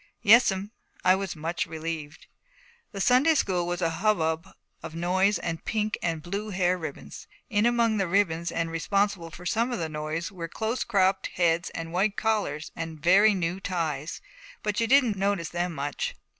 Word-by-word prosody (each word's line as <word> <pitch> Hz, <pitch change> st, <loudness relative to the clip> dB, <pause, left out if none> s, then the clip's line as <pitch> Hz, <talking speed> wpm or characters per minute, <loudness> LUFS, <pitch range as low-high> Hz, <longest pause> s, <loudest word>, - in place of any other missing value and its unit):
'Yes'm.' 205 Hz, -2 st, +5 dB, 0.3 s
I 185 Hz, -, +7 dB
was 190 Hz, -1 st, -2 dB
much 165 Hz, +2 st, -2 dB
relieved. 160 Hz, -1 st, -6 dB, 0.7 s
The 200 Hz, -, -6 dB
Sunday 255 Hz, +10 st, +4 dB
school 180 Hz, -9 st, 0 dB
was 175 Hz, 0 st, -2 dB
a 165 Hz, -, +2 dB
hubbub 165 Hz, -5 st, +1 dB, 0.3 s
of 155 Hz, -, -8 dB
noise 185 Hz, +4 st, +2 dB
and 165 Hz, -1 st, -4 dB
pink 215 Hz, -1 st, -1 dB
and 165 Hz, -2 st, -2 dB
blue 200 Hz, +5 st, -4 dB
hair 185 Hz, -2 st, +1 dB
ribbons. 145 Hz, -, -8 dB, 0.2 s
In 210 Hz, +3 st, +3 dB
among 235 Hz, -2 st, +2 dB
the 195 Hz, -2 st, 0 dB
ribbons, 170 Hz, -3 st, +1 dB
and 165 Hz, 0 st, -2 dB
responsible 195 Hz, +1 st, 0 dB
for 170 Hz, +3 st, -11 dB
some 230 Hz, +5 st, +1 dB
of 240 Hz, -, -1 dB
the 160 Hz, -3 st, -3 dB
noise, 155 Hz, +4 st, -4 dB
were 175 Hz, -4 st, -6 dB
close 220 Hz, +7 st, -2 dB
cropped 190 Hz, -3 st, +2 dB
heads 170 Hz, -1 st, +2 dB
and 165 Hz, 0 st, -5 dB
white 195 Hz, +3 st, +1 dB
collars 205 Hz, -9 st, -1 dB
and 160 Hz, -1 st, -6 dB
very 195 Hz, +7 st, +5 dB
new 175 Hz, 0 st, -2 dB
ties, 165 Hz, -6 st, -3 dB, 0.4 s
but 210 Hz, 0 st, -1 dB
you 230 Hz, -, +1 dB
didn't 245 Hz, -5 st, +4 dB
notice 195 Hz, -3 st, 0 dB
them 175 Hz, 0 st, -2 dB
much. 145 Hz, 0 st, -3 dB
180 Hz, 170 wpm, -27 LUFS, 165-205 Hz, 0.7 s, I